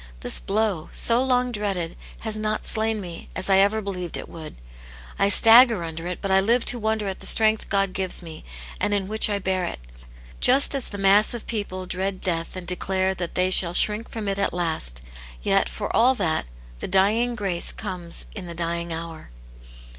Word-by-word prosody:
This - - -1
blow, 200 -5 -1
so 235 +2 +3
long 250 -1 +1
dreaded, 195 -6 -3 0.3
has 220 -1 -4
not 215 0 -2
slain 220 0 +1
me, 175 -4 -9
as 185 +1 -1
I 190 - +5
ever 205 +3 +2
believed 180 -4 -5
it - - -8
would; 160 -2 -10 0.6
I 200 - +3
stagger 225 -2 +7
under 165 +1 -6
it, 180 - -6
but 195 - -2
I 190 - +5
live 230 +5 +1
to 245 - +3
wonder 220 -1 -1
at 190 - -5
the - - -3
strength 220 0 +2
God 195 -2 0
gives 185 -1 -2
me, 160 -2 -10 0.4
and 205 +1 0
in 195 -2 -2
which 215 +1 +4
I 205 - 0
bear 190 -1 -2
it' - - -5 0.6
Just 275 - +4
as 275 -3 +2
the 200 - -8
mass 200 +4 +3
of 235 - -8
people 205 -4 -5
dread 190 +1 -3
death 165 -1 -3
and 185 -1 -7
declare 190 +1 -1
that 175 -2 -6
they 185 +1 +1
shall 175 -2 +4
shrink 215 +4 +4
from 220 -3 -6
it 195 0 -2
at 200 - 0
last: 160 - -2 0.4
yet, - - +2
for - - -5
all 255 +3 +4
that, 160 - -1 0.3
the - - -5
dying 215 +6 +2
grace 195 -6 -1
comes 180 -5 -4
in 190 -4 -7
the 170 - -8
dying 170 0 -3
hour." 165 -1 -7
195 Hz, 200 wpm, -23 LUFS, 175-215 Hz, 0.6 s, stagger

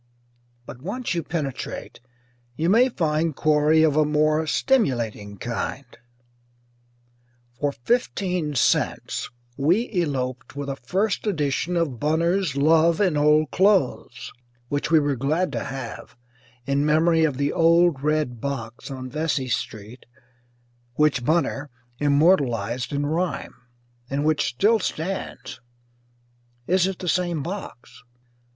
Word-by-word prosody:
But 125 - -10
once 210 - -3
you 170 - -1
penetrate, 145 -6 -5 0.6
you 165 +6 +1
may 245 +5 +5
find 160 - 0
quarry 155 +1 +3
of 155 -3 +3
a 155 - +4
more 155 +1 +1
stimulating 120 - 0
kind. 120 +5 -4 1.7
For 145 0 0
fifteen 180 - -1
cents 120 - 0 0.3
we 175 - +2
eloped 130 -6 -3
with 140 0 -4
a 135 - -2
first 190 - -1
edition 160 -1 -1
of 145 -8 -1
Bunner's 165 +1 +1
"Love 160 +3 +4
in 185 -6 +2
Old 150 -1 +3
Cloathes," 185 - +1 0.4
which 145 +1 -2
we 165 -1 +5
were 145 -2 0
glad 155 +8 0
to - - -3
have 135 -3 -7 0.5
in 140 +1 +1
memory 160 +2 +3
of 145 -5 +1
the 140 +1 0
"old 170 -3 +4
red 150 -6 -1
box 135 -4 -5
on 130 -1 -6
Vesey 145 -2 -2
Street" 110 +1 -5 0.9
which 150 -4 +2
Banner 150 -1 0 0.3
immortalized 140 - +2
in 145 0 -1
rhyme, 170 +4 -2 0.6
and 140 +2 -1
which 155 -1 +2
still 215 - +2
stands 185 +1 -5 1.0
(is 185 +3 +2
it 190 -2 -4
the 180 - -7
same 175 -4 0
box?) 180 - -8
150 Hz, 120 wpm, -23 LUFS, 135-170 Hz, 1.7 s, may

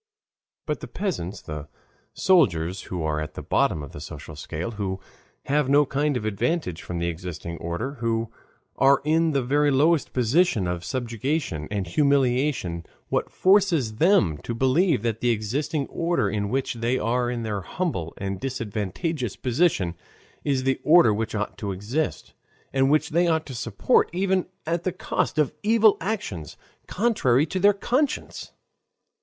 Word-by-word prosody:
But - - -2
the - - -7
peasants, 105 - -4
the 75 -1 -6 0.5
soldiers, 95 - +2
who 90 -3 -4
are 75 -1 -1
at 75 - -6
the - - -6
bottom 75 - +1
of 70 - -9
the 75 - -9
social 75 +1 -9
scale, 80 +7 -5
who 100 -3 -3 0.5
have 145 -1 +1
no 145 +1 +5
kind 145 0 0
of 105 - -5
advantage 110 - -1
from 90 - -5
the 85 - -1
existing 85 -1 -5
order, 85 +11 -3
who 115 -1 -1 0.5
are 135 +1 +5
in 165 +2 +3
the 140 -4 +1
very 145 +4 +2
lowest 150 +3 +3
position 125 - +2
of 90 -1 -3
subjection 120 - -2
and 100 -2 -2
humiliation, 130 - +1 0.3
what - - 0
forces 185 - +3
them 115 - +3
to 115 - -5
believe 130 - +2
that 115 -2 -1
the 120 - +2
existing 135 +7 -1
order 170 +4 0
in 105 -2 -1
which 135 +3 -1
they 120 +2 0
are 120 +1 0
in 120 -1 -3
their 105 -3 -2
humble 90 - -3
and 95 -1 -4
disadvantageous 120 - -3
position 125 - +1 0.5
is 135 -2 0
the 135 0 0
order 150 -6 +6
which 110 +1 -2
ought 105 0 -3
to 100 -2 -3
exist, 110 +12 -3 0.4
and 135 0 +3
which 150 0 +2
they 170 +3 +3
ought 160 -1 +1
to 135 - -8
support 115 -4 +1
even 190 +1 0 0.2
at 170 +1 -1
the 185 - 0
cost 180 - -2
of 150 -3 +2
evil 220 -1 +5
actions 165 - -4 0.3
contrary 155 - +2
to 185 - -3
their 200 +2 +6
conscience? 255 +8 -1
125 Hz, 160 wpm, -25 LUFS, 100-155 Hz, 0.5 s, order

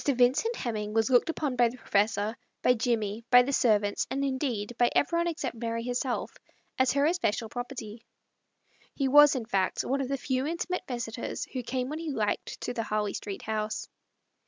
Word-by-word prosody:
Vincekt 275 - +2
Hemming 215 - -3
was 225 +2 +2
looked 245 +5 +4
upon 300 -5 -1
by 240 -1 +4
the 250 - -10
professor, 210 0 +1 0.3
by 250 - +5
Jimmie, 225 -2 -1
by 245 0 +8
the 280 +3 -2
servants, 210 -5 +2
and 275 +1 -1
indeed 250 -5 -2
by 240 0 +5
everybody 340 +4 +2
except 305 -7 -4
Mary 230 0 -3
her 245 - -2
self, 250 0 -2 0.4
as 260 -1 +4
her 280 +1 +3
especial 295 - 0
property. 240 -2 -6 0.9
He 275 - 0
was, 295 +1 +7
in 245 -3 -3
fact, 195 -4 0
one 275 +1 0
of 265 - -2
the 275 - 0
few 260 +1 -1
intimate 345 +2 -3
visitors 235 -2 -4
who 255 - -2
came 255 +1 -2
when 305 +2 -4
he 330 -1 -4
liked 220 -7 -2
to - - -3
the 230 - -2
Harley 210 -2 -1
Street 200 -2 -6
house. 215 0 -3
245 Hz, 185 wpm, -28 LUFS, 220-275 Hz, 0.9 s, by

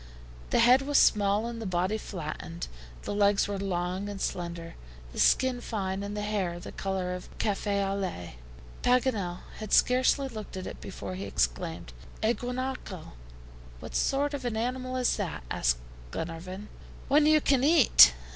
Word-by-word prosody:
The - - +2
head 245 +3 +6
was 285 +1 +1
small 205 +1 +4
and 235 -1 -5
the 220 - -3
body 185 +4 0
flattened, 170 -2 -6 0.4
the - - -3
legs 205 0 +3
were 200 -1 -3
long 185 +1 -2
and 200 -1 -6
slender, 170 -2 -4 0.4
the - - -6
skin 255 -2 +3
fine, 195 -4 -3
and 205 +1 -5
the 210 - -2
hair 195 -5 -1
the - - -8
color 190 -2 -2
of 180 - -7
cafe 200 -1 0
au 195 - -1
lait. 175 - -4 0.4
Paganel 225 -8 +1 0.2
had 215 -2 -7
scarcely 255 +2 +4
looked 215 -5 -7
at 185 - -5
it - - -8
before 185 -1 -6
he 190 +2 -5
exclaimed, 165 - -2 0.3
"A 220 +2 +4
guanaco!" 250 -8 -5 0.7
"What - - -9
sort 285 +2 +1
of 280 -2 -4
an 240 -3 -2
animal 255 +2 -2
is 250 -1 +1
that?" 180 - -4
asked - - +2 0.3
Glenarvan. 180 - -6 0.4
"One 295 +2 +5
you 310 0 +6
can 275 -3 +2
eat." 275 - +8
205 Hz, 165 wpm, -29 LUFS, 180-250 Hz, 0.7 s, eat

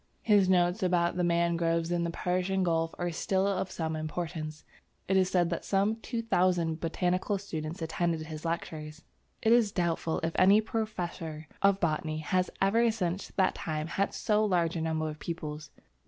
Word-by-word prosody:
His 205 -4 +4
notes 180 +2 +3
about 175 -2 +2
the 180 - 0
mangroves 170 -1 +1
in 170 -1 +1
the - - -1
Persian 185 +2 0
gulf 165 -2 0
are 175 0 -2
still 190 +3 0
of 190 -1 0
some 160 -1 -3
importance. 155 -1 -5 0.4
It 190 - +2
is 185 -1 +4
said 175 -2 +2
that 170 - -2
some 200 +3 +1
two 230 0 -4
thousand 175 -6 +1
botanical 180 +4 0
students 165 -4 -5
attended 165 0 -1
his 155 -1 -7
lectures. 160 -2 -4 0.4
It 225 - +4
is 230 -4 +4
doubtful 170 -3 0
if 165 0 -1
any 195 +3 +7
professor 175 -8 -4
of 200 0 +4
botany 155 -2 -1
has 180 +4 0
ever 225 +5 +3
since 190 -4 -2
that 190 -1 +3
time 155 -1 -3
had 195 +4 -1
so 215 0 +2
large 175 -5 +1
a 165 - -2
number 160 -1 -1
of 155 0 -6
pupils. 155 -3 -5
175 Hz, 170 wpm, -30 LUFS, 160-190 Hz, 0.4 s, any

